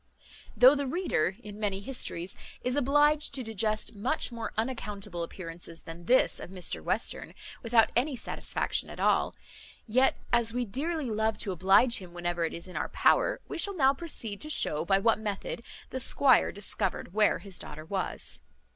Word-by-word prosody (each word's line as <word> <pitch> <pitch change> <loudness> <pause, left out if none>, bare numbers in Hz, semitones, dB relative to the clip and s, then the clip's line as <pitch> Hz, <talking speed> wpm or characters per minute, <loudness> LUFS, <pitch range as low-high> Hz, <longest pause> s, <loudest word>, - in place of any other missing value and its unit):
Though 250 +5 +9
the 285 -1 -1
reader, 255 - 0
in 210 0 -9
many 200 -2 -1
histories, 195 -6 -2 0.3
is 250 +1 0
obliged 290 +2 +3
to 260 - -2
digest 215 0 -2
much 245 +8 -1
more 230 -1 -5
unaccountable 210 -7 -3
appearances 170 -1 -7
than 165 +1 -10
this 255 +7 +4
of - - -8
Mr 185 -2 -1
Western, - - -1 0.3
without 230 -1 +4
any 265 +3 +1
satisfaction 240 - -2
at - - -9
all; - - +2 0.5
yet, 255 +4 +3 0.2
as 235 -1 +3
we 245 0 0
dearly 280 +4 -2
love 220 0 0
to 200 - -2
oblige 195 +7 +4
him 180 -2 -12
whenever 175 -1 -1
it - - -4
is 170 +2 -7
in 180 - -11
our - - -2
power, - - +3
we - - -5
shall 400 +3 0
now 270 -2 +5
proceed 245 -9 -5
to 305 - -4
shew 155 - +1
by 195 +2 +4
what 225 +3 +3
method 210 +1 -4 0.3
the 260 - -3
squire 260 0 +4
discovered 195 -3 -3
where 210 0 +4
his 195 -3 -6
daughter 155 +1 -8
was. 190 +2 -1
220 Hz, 175 wpm, -29 LUFS, 190-260 Hz, 0.5 s, Though